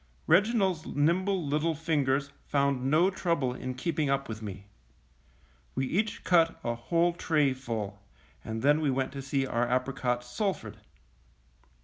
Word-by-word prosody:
Reginald's 195 -6 +3
nimble 175 +4 +1
little 155 +3 0
fingers 140 -3 0 0.2
found 140 -2 +1
no 170 +6 +4
trouble 165 -9 0
in 130 0 -5
keeping 150 +1 -1
up 135 0 0
with 110 -1 -6
me. 100 -2 -7 1.1
We 135 - 0
each 210 +10 -1
cut 165 -2 +3
a 120 - 0
whole 170 +9 +1
tray 150 -5 +2
full, 110 -6 -5 0.4
and 110 +1 -5
then 145 +2 +4
we 150 - +1
went 130 0 0
to 140 0 -6
see 135 0 -1
our 120 -1 0
apricots 125 -1 0
sulphured. 195 - -3
140 Hz, 140 wpm, -29 LUFS, 130-165 Hz, 1.1 s, no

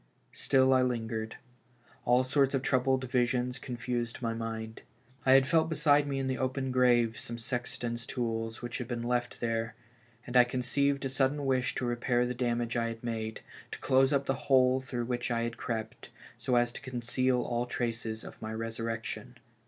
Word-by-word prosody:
Still 130 0 +3
I 130 - +5
lingered; 115 -3 -2 0.7
all 125 +1 +4
sorts 135 +1 +2
of 135 - -1
troubled 130 0 +2
visions 125 0 0
confused 120 -1 -3
my 115 -2 -1
mind. 110 -1 -5 0.5
I 130 - +8
had 135 0 +7
felt 160 +3 +3
beside 150 -2 +3
me 140 -1 -2
in 135 - -1
the 130 0 -1
open 130 0 -1
grave 120 -3 +3
some 115 - -5
sexton's 120 0 -3
tools 115 -2 -3
which 120 +1 -4
had 125 - -4
been 120 -1 -3
left 120 0 -1
there, 115 0 -1 0.5
and 125 - -7
I 125 - +9
conceived 135 +3 0
a - - 0
sudden 135 +2 +1
wish 130 -1 +1
to 125 - -1
repair 120 0 +1
the 125 - -2
damage 120 -1 -1
I 115 -1 +1
had 115 0 -6
made, 110 -2 -3 0.3
to - - -6
close 135 +1 +3
up 140 -1 +2
the 135 - +1 0.2
hole 130 -1 +5
through 125 -2 -3
which 120 0 -2
I 115 -1 0
had 115 0 -3
crept, 110 -2 -5 0.3
so 125 - -1
as 120 0 +3
to - - -9
conceal 130 0 0
all 120 +1 -1
traces 115 -4 -3
of - - -11
my 110 - -4
resurrection. 115 +2 -4
125 Hz, 185 wpm, -30 LUFS, 115-130 Hz, 0.7 s, I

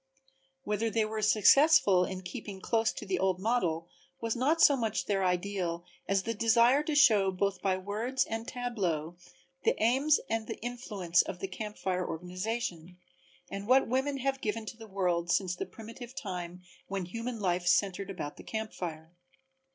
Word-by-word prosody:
Whether 215 +1 0
they 220 0 +1
were 215 0 -3
successful 215 - +5
in 185 +1 -6
keeping 200 0 -7
close 225 +3 +1
to - - -8
the 190 -2 -1
old 190 -2 +1
model 180 -6 0 0.3
was 230 -1 -1
not 285 +7 +2
so 290 -3 +7
much 225 -4 -1
their 195 -2 0
ideal 180 -2 -1 0.2
as 195 -1 +1
the 230 - -2
desire 235 +5 +4
to 300 0 -2
show 210 -9 +6
both 195 +1 -1
by 190 -2 +1
words 215 +7 -1
and 225 +1 -4
tableaux 185 -10 -2 0.5
the - - +3
aims 270 +7 +3
and 225 0 -2
the - - -5
influence 210 -8 0
of 175 - -5
the 195 - -4
Camp 210 +3 -6
Fire 185 -1 -1
organization, 180 0 -4 0.5
and 195 +1 -5
what 260 +2 +5
women 265 +3 0
have 270 0 -1
given 220 +1 -2
to 220 - -7
the 225 -1 -11
world 180 -4 0
since 180 0 +1
the - - -5
primitive 230 +3 -10
time 180 -7 -6 0.2
when 195 -2 -3
human 230 +5 -5
life 180 -2 0
centered 195 +1 +2
about 150 -6 -5
the - - -11
camp 220 -1 -4
fire. 160 -1 -6
205 Hz, 175 wpm, -30 LUFS, 180-230 Hz, 0.5 s, so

